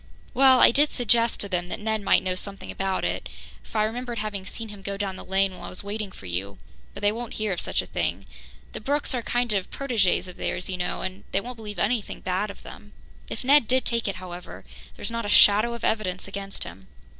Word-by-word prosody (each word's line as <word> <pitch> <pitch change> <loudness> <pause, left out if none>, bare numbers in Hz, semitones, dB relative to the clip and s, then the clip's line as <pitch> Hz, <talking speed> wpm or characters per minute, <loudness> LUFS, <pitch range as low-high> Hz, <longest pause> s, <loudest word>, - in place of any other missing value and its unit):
"Well, 265 -1 +7
I - - +9
did 290 +4 +4
suggest 235 -1 +2
to 200 - -1
them 180 -2 -1
that - - -4
Ned 220 0 -1
might 200 - +4
know 185 -1 0
something 195 +2 -4
about 195 -1 -1
it, - - -2 0.3
for - - -7
I 215 - +4
remembered 240 +2 -3
having 205 -3 -4
seen 225 -1 -7
him 205 -1 -10
go 200 0 -4
down 195 -2 -2
the - - -8
lane 195 0 +2
while - - -9
I - - -6
was 180 - -5
waiting 205 0 -4
for 100 - -13
you, 95 +2 -3 0.4
but - - -7
they 205 0 +4
won't 235 +1 -5
hear 215 -2 0
of 175 - -2
such - - 0
a - - -10
thing. - - -2 0.5
The - - -6
Brookes 285 +5 0
are 250 - 0
kind 240 -1 +1
of 195 -2 -1
protégés 225 -10 +1
of 180 - -10
theirs, 180 +1 -3
you 185 - -2
know, 180 0 -2
and 185 +1 -5
they - - +2
won't 245 +5 -6
believe 210 -3 -7
anything 210 +4 0
bad 190 +3 -1
of 200 - -10
them. 210 - -12 0.4
If - - -5
Ned 275 -2 +6
did 260 0 +2
take 230 -2 +1
it, 200 - -1
however, 180 -1 -8 0.3
there's - - -4
not 230 0 -2
a - - -2
shadow 215 +4 +6
of 235 - -9
evidence 195 -5 0
against 195 0 -5
him." 95 +3 -11
205 Hz, 240 wpm, -26 LUFS, 190-230 Hz, 0.5 s, I